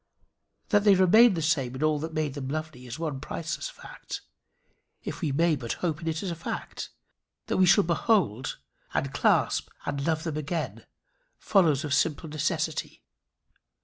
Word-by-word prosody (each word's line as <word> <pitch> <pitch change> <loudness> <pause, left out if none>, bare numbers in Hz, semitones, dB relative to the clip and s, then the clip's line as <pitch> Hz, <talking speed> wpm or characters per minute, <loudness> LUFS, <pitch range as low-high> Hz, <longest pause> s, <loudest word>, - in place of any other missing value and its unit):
That 205 -2 +4
they 205 -2 +6
remain 195 +4 +6
the 165 - -2
same 135 -5 +1
in 135 - -3
all 155 -1 +2
that 160 +2 -4
made 155 -3 -1
them 135 -2 -5
lovely, 155 -3 -5
is 120 - -5
the 165 - -6
one 145 -4 -2
priceless 165 - -4
fact - - -9 0.8
if - - -6
we 155 -5 0
may 165 +3 +3
but 120 -5 -3
hope 165 -3 -2
in 165 - -6
it 160 +2 -1
as 185 - -2
a - - -3
fact. 165 - -5 0.6
That - - -1
we 185 -1 +5
shall 200 +3 +6
behold, 165 - +1 0.4
and - - -1
clasp, - - +2 0.2
and 140 -1 -2
love 160 +1 0
them 160 -3 -3
again 155 +2 -4 0.5
follows 165 -8 +3
of 145 - -1
simple 155 +2 +1
necessity. 155 +1 -2
160 Hz, 175 wpm, -27 LUFS, 145-170 Hz, 0.8 s, they